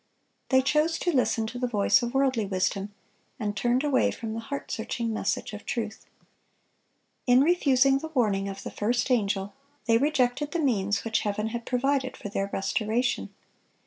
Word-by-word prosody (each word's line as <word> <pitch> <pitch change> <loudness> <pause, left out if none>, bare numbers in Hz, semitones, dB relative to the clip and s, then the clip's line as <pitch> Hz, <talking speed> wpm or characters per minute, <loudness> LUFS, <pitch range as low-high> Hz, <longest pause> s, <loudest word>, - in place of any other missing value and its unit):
They 260 -1 +4
chose 305 +4 +2
to 350 - 0
listen 245 -4 +1
to 245 +3 -6
the 250 - 0
voice 225 +2 +3
of 240 +2 -3
worldly 260 -6 +2
wisdom, 195 +1 -1 0.5
and 205 -3 -2
turned 240 +6 +1
away 285 -3 +3
from 225 -1 -5
the 225 - -3
heart 280 +5 -6
searching 230 -1 -2
message 215 - -2
of 210 - -7
truth. 220 -2 -4 1.2
In 250 +1 +6
refusing 275 -4 +4
the 320 - -6
warning 210 -10 0
of 195 0 -7
the - - -6
first 240 +5 0
angel, 200 -4 0 0.3
they 230 -1 +4
rejected 285 0 +1
the 340 - 0
means 205 -9 +1
which 225 -1 +1
Heaven 210 +1 -2
had 235 +1 -6
provided 260 +1 0
for 205 - -7
their 195 0 -2
restoration. 225 +4 -1
240 Hz, 170 wpm, -27 LUFS, 210-265 Hz, 1.2 s, In